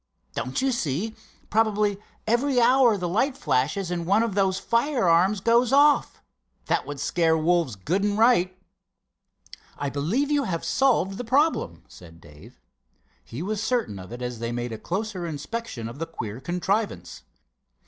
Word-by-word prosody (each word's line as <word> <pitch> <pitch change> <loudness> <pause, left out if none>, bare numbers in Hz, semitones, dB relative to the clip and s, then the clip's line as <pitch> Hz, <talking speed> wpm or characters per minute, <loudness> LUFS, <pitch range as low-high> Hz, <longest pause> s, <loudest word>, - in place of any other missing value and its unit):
Don't 130 - -3
you 270 - +2
see, 210 - -2 0.4
probably 210 -2 +1 0.3
every 245 +4 +2
hour 245 -2 +5
the 180 -2 -3
light 255 +10 0
flashes 165 +8 0
and 170 -1 -3
one 205 +4 +4
of 230 -3 -2
those 190 -1 +1
firearms 210 - +2
goes 235 +3 +3
off. 290 +1 +3 0.4
That - - 0
would 145 -1 -6
scare 160 +2 +2
wolves 165 -6 +1
good 170 - -1
and 205 0 0
right." 200 -6 +3 1.2
"I 140 -1 -3
believe 205 - -1
you 290 -2 +2
have 165 -3 -3
solved 225 -8 +1
the - - -3
problem," 255 - +1
said 85 -2 -15
Dave. 75 -2 -16 0.6
He 115 - -7
was 210 +2 -2
certain 220 - -1
of 90 +3 -11
it 120 +1 -7
as 125 -2 -4
they 115 0 -3
made 120 0 -3
a 110 - -6
closer 190 - -3
inspection 155 - -5
of 120 +5 -9
the 165 - -3
queer 115 -8 -6
contrivance. 185 +7 -2
190 Hz, 160 wpm, -25 LUFS, 145-230 Hz, 1.2 s, hour